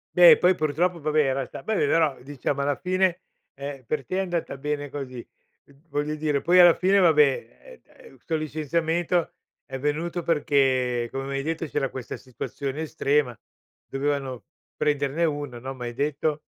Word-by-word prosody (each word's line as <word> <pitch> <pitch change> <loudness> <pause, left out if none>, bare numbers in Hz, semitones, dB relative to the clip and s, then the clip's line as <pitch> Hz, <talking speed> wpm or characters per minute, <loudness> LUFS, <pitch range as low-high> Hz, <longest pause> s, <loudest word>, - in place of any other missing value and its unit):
Beh, - - +9
poi 185 0 +4
purtroppo, 165 +3 0
vabbè, 155 +1 +1
era 135 -1 0
sta - - -9
vabbè, 220 +3 -1
però 155 -4 +2
diciamo 140 +1 -3
alla 140 -1 0
fine, 185 -1 0 0.3
ehm, 140 -1 -7
per 135 +2 -3
te 185 - -4
è - - +1
andata 175 -6 -3
bene 145 +1 -3
così. 135 -3 -6 0.5
Mh, 140 - -21 0.2
voglio 145 +1 -2
dire, 150 -2 0
poi 180 +2 +3
alla 175 -1 +9
fine, 195 +2 +3
vabbè, 160 -5 +6
eh, 150 - -2 0.2
eh, - - -16
con 160 -1 0
licenziamento 160 +3 -1 0.3
è 135 -1 -6
venuto 160 +5 -2
perché, 130 -6 +1
come 135 0 -4
m'hai 135 0 -3
detto, 165 +1 -2
c'era 140 -3 -2
questa 130 -3 -6
situazione 140 +3 -5
estrema, 140 -5 0 0.5
dovevano 135 -2 -3 0.3
prenderne 145 +2 +1
1, 145 -6 -3
no, 135 +2 -6
m'hai 120 -2 -6
detto. 145 +2 -1
145 Hz, 165 wpm, -25 LUFS, 135-165 Hz, 0.5 s, Beh